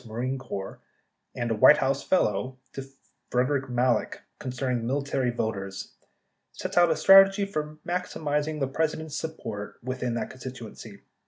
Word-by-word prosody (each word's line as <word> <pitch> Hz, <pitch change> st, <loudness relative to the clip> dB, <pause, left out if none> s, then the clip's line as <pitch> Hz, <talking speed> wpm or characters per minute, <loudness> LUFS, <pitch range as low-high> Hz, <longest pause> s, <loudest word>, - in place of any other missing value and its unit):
Marine 125 Hz, +4 st, -3 dB
Corps 100 Hz, -7 st, -6 dB, 0.6 s
and 120 Hz, -1 st, -2 dB
a -, -, +1 dB
White 150 Hz, +7 st, +7 dB
House 135 Hz, 0 st, 0 dB
fellow, 130 Hz, -, 0 dB, 0.2 s
to 135 Hz, -, -5 dB, 0.5 s
Frederick 130 Hz, +2 st, 0 dB
Malek 125 Hz, 0 st, 0 dB, 0.2 s
con 130 Hz, -, -4 dB
cerning 125 Hz, -1 st, -1 dB
military 135 Hz, +1 st, -1 dB
voters, 100 Hz, -4 st, -4 dB, 0.6 s
sets -, -, -5 dB
out 175 Hz, -, +7 dB
a 165 Hz, -, +2 dB
basic -, -, -6 dB
strategy 195 Hz, +1 st, +7 dB
for 155 Hz, -5 st, -4 dB
maximizing 155 Hz, -4 st, -2 dB
the 135 Hz, -, 0 dB
President's 155 Hz, +1 st, -2 dB
support 115 Hz, -11 st, -5 dB
within 125 Hz, -1 st, -2 dB
that 115 Hz, -, -3 dB
constituency. 120 Hz, -5 st, -9 dB
130 Hz, 145 wpm, -27 LUFS, 120-150 Hz, 0.6 s, White